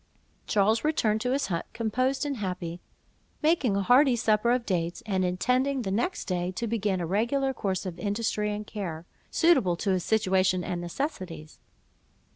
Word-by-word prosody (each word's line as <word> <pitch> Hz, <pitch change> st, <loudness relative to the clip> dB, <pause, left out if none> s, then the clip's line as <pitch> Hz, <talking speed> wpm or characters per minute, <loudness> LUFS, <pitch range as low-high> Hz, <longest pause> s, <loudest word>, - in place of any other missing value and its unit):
'" -, -, -38 dB
Charles 215 Hz, +2 st, +2 dB
returned 220 Hz, -8 st, +1 dB
to 250 Hz, +1 st, 0 dB
his 275 Hz, +2 st, +1 dB
hut, 170 Hz, -3 st, -3 dB
composed 255 Hz, +5 st, 0 dB
and 280 Hz, -2 st, -2 dB
happy, 180 Hz, -4 st, -4 dB, 0.6 s
making 300 Hz, -, +3 dB
a 200 Hz, -, 0 dB
hearty 250 Hz, +4 st, +5 dB
supper 220 Hz, -1 st, +2 dB
of 245 Hz, -1 st, +1 dB
dates, 175 Hz, +3 st, -2 dB
and 190 Hz, -3 st, 0 dB
intending 250 Hz, +9 st, +1 dB
the 190 Hz, -, -2 dB
next 245 Hz, -, -1 dB
day 180 Hz, -1 st, -1 dB
to 235 Hz, -, -3 dB
begin 210 Hz, -4 st, 0 dB
a 175 Hz, -, -2 dB
regular 240 Hz, -, 0 dB
course 195 Hz, -5 st, -2 dB
of 175 Hz, -2 st, -6 dB
industry 210 Hz, +1 st, -1 dB
and 210 Hz, +1 st, -4 dB
care, 175 Hz, -7 st, -5 dB, 0.2 s
suitable 265 Hz, -, +3 dB
to 195 Hz, +3 st, -1 dB
his 185 Hz, -2 st, 0 dB
situation 190 Hz, -4 st, +2 dB
and 175 Hz, 0 st, -3 dB
necessities. 175 Hz, -, -5 dB
210 Hz, 170 wpm, -27 LUFS, 185-250 Hz, 0.6 s, hearty